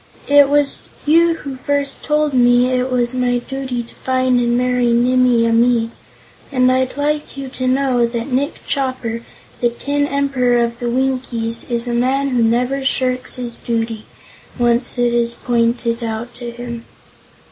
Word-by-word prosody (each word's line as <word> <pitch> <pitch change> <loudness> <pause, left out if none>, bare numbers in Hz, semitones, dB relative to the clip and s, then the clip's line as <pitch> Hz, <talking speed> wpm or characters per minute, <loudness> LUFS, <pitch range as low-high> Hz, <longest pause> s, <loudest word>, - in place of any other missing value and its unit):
It 285 -1 +6
was 290 -1 +2 0.2
you 330 +2 +4
who 275 -4 -7
first 280 +1 -2
told 300 -1 +1
me 245 0 +4
it 255 +1 0
was 245 -1 +1
my 250 -1 +1
duty 260 -1 -4
to 230 - -16
find 255 -1 +1
and 240 0 +1
marry 250 -1 +1
Nimmie 245 -1 +3
Amee, 230 0 +2 0.6
and 255 -2 +3
I'd 260 +1 0
like 295 0 -2
you 270 -1 -5
to 255 0 -4
know 255 -2 +2
that 235 +2 -4
Nick 280 +5 -2
Chopper, 255 -4 -2 0.4
the 240 - +2
Tin 285 +4 -1
Emperor 260 -4 +1
of 235 0 -3
the 240 - -2
Winkies, 250 -3 -2
is 235 0 0
a 240 - -1
man 265 +3 +1
who 250 -2 +1
never 245 +4 +1
shirks 255 -1 -1
his 240 -2 -4
duty, 225 -2 -3 0.5
once 240 0 +1
it 240 -1 +2
is 235 0 +1
pointed 235 0 0
out 225 +2 -4
to 240 -1 -7
him." 235 -1 -7
250 Hz, 160 wpm, -18 LUFS, 235-265 Hz, 0.6 s, It